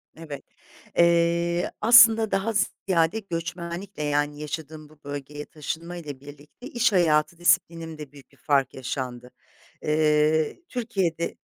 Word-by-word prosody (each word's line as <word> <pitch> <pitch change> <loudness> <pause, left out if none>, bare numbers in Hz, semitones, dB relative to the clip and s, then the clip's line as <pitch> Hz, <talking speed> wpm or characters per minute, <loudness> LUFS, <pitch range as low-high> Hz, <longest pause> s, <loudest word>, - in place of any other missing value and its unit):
Evet, 155 -3 -9 0.5
eee, 170 0 +2
aslında 225 -1 +7
daha 200 +4 0
z 205 -2 +2 0.2
ziyade 170 +2 +2
göçmenlikle 170 -1 -6
yani 145 0 -1
yaşadığım 155 0 -7
bu 155 -1 -21
bölgeye 145 +1 -7
taşınmayla 160 -1 -7
birlikte 145 - -13
iş 240 -2 +1
hayatı 165 -3 +2
disiplinimde 165 -4 0
büyük 140 -3 -17
bir - - -24
fark 140 -3 +1
yaşandı. 125 -1 -5 0.5
Eee, 155 - +2
Türkiye'de, 190 -9 -2
160 Hz, 115 wpm, -25 LUFS, 150-175 Hz, 0.5 s, aslında